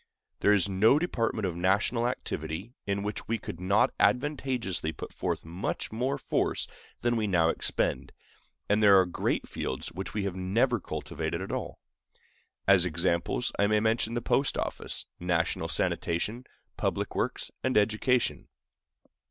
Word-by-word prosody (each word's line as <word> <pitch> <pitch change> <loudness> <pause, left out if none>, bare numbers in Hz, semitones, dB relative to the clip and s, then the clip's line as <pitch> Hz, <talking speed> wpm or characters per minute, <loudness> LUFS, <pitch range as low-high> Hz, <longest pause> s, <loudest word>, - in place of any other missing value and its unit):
There 105 - +4
is 100 -3 +4
no 100 +8 +5
department 115 - 0
of 90 -3 -2
national 100 +7 +2
activity 110 -3 -4
in 100 0 0
which 105 +1 -4
we 115 - 0
could 85 - -7
not 100 +3 +3
advantageously 125 - +1
put - - -8
forth - - -2
much 85 +4 -3
more 130 +5 -1
force - - 0 0.3
than 120 0 +2
we 110 -1 0
now 85 -4 +3
expend; - - -1 0.6
and 105 +1 +3
there 100 -2 +8
are 95 - +4
great 90 - -1
fields - - -4
which 95 +4 -6
we 105 - 0
have 100 -2 -2
never 110 +7 +1
cultivated - - -4
at - - -5
all. - - -4 0.9
As 95 -3 +6
examples, 85 +6 0
I 100 - +4
may 105 0 +3
mention 110 +1 +1
the 120 - -2
post 135 +3 +1
office, - - -4
national 85 -1 0
sanitation, 105 +9 -1 0.3
public - - -1
works, - - -2
and 130 -3 +2
education. 110 +4 +2
105 Hz, 150 wpm, -29 LUFS, 95-120 Hz, 0.9 s, there